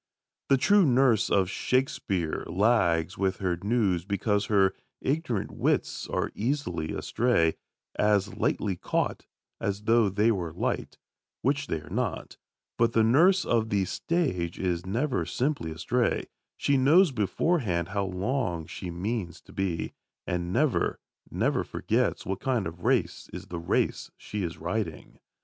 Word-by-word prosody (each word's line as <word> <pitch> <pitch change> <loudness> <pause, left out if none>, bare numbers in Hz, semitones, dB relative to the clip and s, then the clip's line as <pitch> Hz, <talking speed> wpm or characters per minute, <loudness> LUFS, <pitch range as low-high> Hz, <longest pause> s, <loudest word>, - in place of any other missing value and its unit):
The 135 - +5
true 200 +10 +5
nurse 125 - +3
of 95 -2 +3
Shakespeare 95 -8 -1
lags 95 -5 +2
with 95 -1 +1
her 95 -3 0
news 100 -5 +1
because 100 +1 0
her 95 -3 +3 0.3
ignorant 135 - -1
wits - - -1
are - - -1
easily 115 - -2
astray, 110 -10 +1 0.4
as 105 0 +2
lightly 100 -3 0
caught - - -2 0.3
as 100 +1 -2
though 115 -1 +4
they 105 +4 +3
were 85 -6 -2
light, 85 - -2 0.5
which 140 +1 +1
they 80 - -2
are - - -13
not; - - -3 0.4
but 115 0 +3
the 110 - +4
nurse 170 - +5
of 115 -2 +1
the 100 -2 +1
stage 95 - -1
is 90 -1 -2
never 125 +7 0
simply 130 - -1
astray: 115 +10 0 0.3
she 140 - +2
knows 155 +6 +5
beforehand 105 - 0
how 100 0 -1
long 95 - -2
she 90 - -7
means 90 0 -3
to - - -17
be, 95 -4 -2 0.3
and 90 0 -2
never, - - +1 0.3
never - - 0
forgets - - -1
what 95 +1 -3
kind 125 -6 0
of 85 +1 -7
race - - 0
is - - -7
the 85 - -4
race 85 - 0
she 105 - -5
is 85 -2 -3
riding. 85 -1 -4
100 Hz, 145 wpm, -28 LUFS, 90-125 Hz, 0.5 s, The